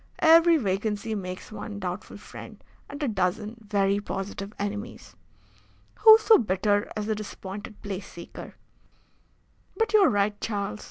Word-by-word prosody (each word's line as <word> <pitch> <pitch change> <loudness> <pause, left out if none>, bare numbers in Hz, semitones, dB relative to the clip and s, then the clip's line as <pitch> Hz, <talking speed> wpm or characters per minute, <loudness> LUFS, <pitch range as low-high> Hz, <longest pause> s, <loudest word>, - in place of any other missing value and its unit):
"Every 330 +1 +6
vacancy 210 -1 -2
makes 185 -2 -6
one 210 -1 -7
doubtful 180 +1 -5
friend - - -12 0.3
and 285 +1 -6
a - - +1
dozen 210 +2 -1
very 200 -1 +1
positive 200 0 -5
enemies. 205 +3 -6 0.8
Who 440 -1 +10
so 440 0 +5
bitter 205 -1 0
as 210 - -3
the 220 - 0
disappointed 205 0 -8
place 195 -2 -5
seeker? 170 - -10 1.2
But 450 -1 0
you 430 - +7
are 390 - +6
right, 205 0 0
Charles. 205 -1 -3
205 Hz, 140 wpm, -26 LUFS, 200-230 Hz, 1.2 s, Who